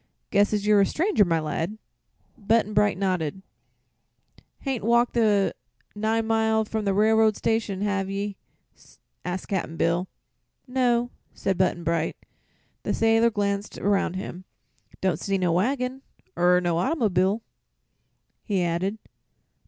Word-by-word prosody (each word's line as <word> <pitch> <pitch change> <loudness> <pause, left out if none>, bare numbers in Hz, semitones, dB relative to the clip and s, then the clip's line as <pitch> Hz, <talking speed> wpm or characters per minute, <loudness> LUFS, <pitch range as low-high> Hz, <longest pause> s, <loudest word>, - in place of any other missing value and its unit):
"Guess 205 0 +3
as 210 -1 -1
you're 210 -1 +5
a - - +5
stranger, 350 - +2
my 165 -3 +1
lad." 165 +6 -3 0.6
Button 220 0 +1
Bright 210 -2 +3
nodded. 185 -2 -1 1.2
"Hain't 265 -4 -3
walked 235 +2 +3
the 210 -4 +2 0.4
nine 220 +2 0
mile 220 0 +2
from 215 0 -3
the 200 - +2
railroad 220 +1 +4
station, 220 -4 -1
hev 200 -2 -1
ye?" 200 +1 -3 0.9
asked 180 +1 -4
Cap'n 175 -4 -2
Bill. 175 +2 +1 0.6
"No," 245 -2 +1 0.2
said 195 - -1
Button 180 -1 0
Bright. 165 -1 -1 0.6
The - - -1
sailor 225 +1 +4
glanced 200 -1 -2
around 200 -3 +1
him. 185 -1 -6 0.6
"Don't 190 -2 +1
see 195 -1 -1
no 180 -2 +1
waggin, 250 +8 0 0.3
er 180 +1 +4
no 175 -2 0
autymob'l'," 200 - +1 1.0
he 195 -5 0
added. 175 +5 -1
205 Hz, 130 wpm, -25 LUFS, 185-225 Hz, 1.2 s, you're